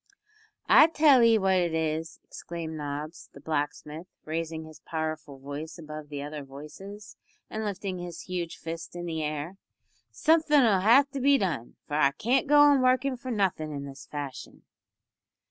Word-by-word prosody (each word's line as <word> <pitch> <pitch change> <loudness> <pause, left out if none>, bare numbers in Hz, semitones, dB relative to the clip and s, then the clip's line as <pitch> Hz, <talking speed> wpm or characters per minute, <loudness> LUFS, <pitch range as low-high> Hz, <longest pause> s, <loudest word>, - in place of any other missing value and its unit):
"I 310 - +8
tell 295 -5 +5
'ee 230 -1 +6
what 190 -2 +2
it 170 -2 0
is," 160 0 -2
exclaimed 165 -2 -7
Nobbs, 150 +2 -6
the - - -12
blacksmith, 150 +2 -4 0.2
raising 160 0 -3
his 155 -1 -13
powerful 155 -3 -5
voice 145 +5 -7
above 155 -2 -9
the 145 -1 -5
other 150 +1 -6
voices, 190 +10 -11 0.3
and 220 0 -3
lifting 195 -2 -4
his 175 -1 -7
huge 175 -2 -4
fist 165 +1 -7
in 175 0 -5
the 160 -2 -3
air, 155 +4 -4 0.5
"something'll 295 - +4
have 255 +8 +5
to 275 - -4
be 280 +2 +5
done, 160 - -3
for - - -9
I 140 -2 +4
can't 260 - +1
go 295 +1 +6
on 290 -2 +6
workin' 255 +1 +2
for 255 +1 -8
nothin' 190 -9 0
in 140 -1 -5
this 140 0 -10
fashion." 145 -3 -7
165 Hz, 165 wpm, -28 LUFS, 150-220 Hz, 0.5 s, I